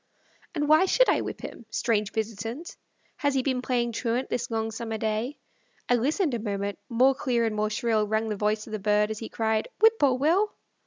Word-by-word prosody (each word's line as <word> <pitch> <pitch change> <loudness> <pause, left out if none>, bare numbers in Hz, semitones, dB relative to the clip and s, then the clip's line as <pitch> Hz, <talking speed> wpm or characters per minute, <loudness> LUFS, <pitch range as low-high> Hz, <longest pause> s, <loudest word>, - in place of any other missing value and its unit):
And 295 -2 0
why 310 +5 +5
should - - +4
I - - +3
whip - - -6
him? 230 - -9
Strange 215 -3 0
visitant, 225 - -4 0.4
Has 285 -1 0
he 260 - +2
been 255 -2 0
playing 240 -2 0
truant 235 +2 -1
this 240 - -2
long 225 -1 -1
summer 225 0 -4
day? 220 +6 -2 0.5
I - - +3
listened 285 - +1
a 235 - -1
moment; 200 -2 -3
more 255 +3 +4
clear 240 -3 0
and 220 -1 -1
more 215 0 0
shrill 215 -1 +1
Rang 220 +1 0
the 215 - -2
voice 210 +1 0
of 220 - -10
the 215 - -2
bird, 210 +1 +2
as 215 - -4
he 225 - -6
cried, 220 -1 0
"Whip 445 0 +5
poor 270 -3 +4
Will." 345 +11 +2
230 Hz, 210 wpm, -27 LUFS, 215-265 Hz, 0.5 s, why